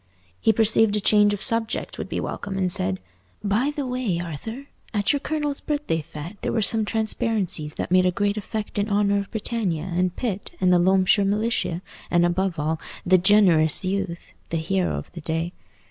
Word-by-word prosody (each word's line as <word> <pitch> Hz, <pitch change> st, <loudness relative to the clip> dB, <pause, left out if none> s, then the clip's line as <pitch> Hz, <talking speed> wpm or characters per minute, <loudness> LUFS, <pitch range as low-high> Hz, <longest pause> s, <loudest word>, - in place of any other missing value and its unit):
He -, -, +4 dB
perceived 220 Hz, -1 st, +3 dB
a -, -, +1 dB
change 210 Hz, 0 st, +4 dB
of 205 Hz, -1 st, +1 dB
subject 230 Hz, -2 st, +1 dB
would -, -, -5 dB
be -, -, -2 dB
welcome, 195 Hz, -1 st, -4 dB
and 185 Hz, -2 st, +1 dB
said, 95 Hz, -, 0 dB, 0.4 s
"By 215 Hz, +7 st, +1 dB
the 285 Hz, -3 st, -2 dB
way, 250 Hz, -9 st, -1 dB
Arthur, 175 Hz, -, -6 dB, 0.3 s
at 205 Hz, +3 st, +2 dB
your 285 Hz, -, 0 dB
colonel's 295 Hz, -1 st, -2 dB
birthday 290 Hz, -, -1 dB
fête 155 Hz, +6 st, -9 dB
there -, -, -1 dB
were 220 Hz, -, +1 dB
some 220 Hz, +1 st, +3 dB
transparencies 210 Hz, -8 st, -1 dB
that -, -, -4 dB
made 185 Hz, 0 st, +5 dB
a -, -, +2 dB
great 200 Hz, +2 st, 0 dB
effect 210 Hz, 0 st, -4 dB
in 205 Hz, +2 st, 0 dB
honour 200 Hz, 0 st, +2 dB
of 200 Hz, -, -5 dB
Britannia, 210 Hz, -7 st, -2 dB
and 180 Hz, +1 st, 0 dB
Pitt, 205 Hz, -6 st, -4 dB
and 185 Hz, -1 st, +3 dB
the 175 Hz, -, +5 dB
Loamshire 190 Hz, +3 st, +4 dB
Militia, 200 Hz, -3 st, -1 dB, 0.3 s
and, 175 Hz, 0 st, +3 dB
above 175 Hz, 0 st, 0 dB
all, 155 Hz, +1 st, -1 dB, 0.3 s
the 185 Hz, 0 st, +5 dB
'generous 180 Hz, -5 st, +4 dB
youth,' 190 Hz, -2 st, -3 dB, 0.2 s
the 165 Hz, -, -1 dB
hero 180 Hz, +3 st, 0 dB
of -, -, -8 dB
the 170 Hz, -, -9 dB
day. 165 Hz, +3 st, -2 dB
195 Hz, 190 wpm, -24 LUFS, 175-220 Hz, 0.4 s, made